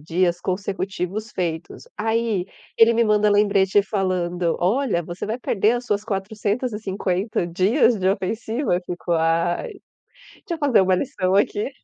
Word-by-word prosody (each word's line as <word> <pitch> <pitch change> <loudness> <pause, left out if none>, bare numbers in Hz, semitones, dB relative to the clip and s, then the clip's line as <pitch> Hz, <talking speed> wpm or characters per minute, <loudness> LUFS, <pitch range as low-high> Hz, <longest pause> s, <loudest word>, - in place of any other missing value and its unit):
dias 175 +3 0
consecutivos 195 +2 -3
feitos. 165 -3 -4
Aí, 225 -4 0 0.3
ele 230 +1 +6
me 235 0 +3
manda 210 0 +3
lembrete 205 -1 +3
falando: 180 -4 -1
"Olha, 205 0 +1
você 175 +2 -6
vai 225 +4 -3
perder 215 -1 +1
as 245 0 -2
suas 205 -2 0
450 205 -2 -2
dias 195 - +3
de 190 0 +1
ofensiva? 215 +2 -1
Fico: 175 0 -4
"Ai, 170 - +1 0.7
deixa 350 - -2
eu - - -7
fazer 280 -9 +4
uma 185 0 +3
lição 185 -3 -1
aqui". 205 +4 +1
195 Hz, 135 wpm, -22 LUFS, 180-220 Hz, 0.7 s, ele